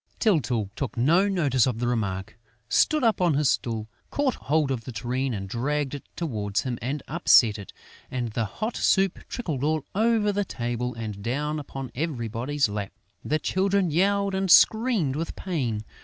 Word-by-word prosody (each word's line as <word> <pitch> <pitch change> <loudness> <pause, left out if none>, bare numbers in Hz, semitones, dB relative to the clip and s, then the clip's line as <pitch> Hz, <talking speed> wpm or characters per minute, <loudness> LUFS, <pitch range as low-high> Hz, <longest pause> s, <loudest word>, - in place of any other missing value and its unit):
Tyltyl 125 - +1
took 135 -3 -4
no 165 +11 +4
notice 145 - +2
of 125 -3 -1
the 120 +1 -1
remark, 105 -3 -2 0.3
stood 305 -3 +3
up 225 -5 +2
on 170 -5 +3
his 145 -1 +3
stool, 110 -2 -2 0.2
caught 285 -3 +1
hold 150 -4 0
of 120 -3 -2
the 130 - -6
tureen 125 +3 -2
and 100 -4 -4
dragged 140 +6 -1
it 145 - -6
towards 105 - -2
him 125 -1 -4
and 135 +4 -3
upset 120 -9 +4
it; 100 - -9 0.4
and 125 -2 -2
the 115 +1 -1
hot 215 - -4
soup 195 -2 +2
trickled 155 - -3
all 155 -1 0
over 220 0 +2
the 205 0 0
table 120 - -3
and 110 -3 -6
down 150 +7 -2
upon 135 -2 -7
everybody's 130 -1 -1
lap. 105 -1 -5 0.3
The 155 - +1
children 190 +2 +1
yelled 200 +4 +2
and 190 0 -1
screamed 220 - +5
with 165 +2 -4
pain. 125 - -2
140 Hz, 170 wpm, -26 LUFS, 115-180 Hz, 0.4 s, screamed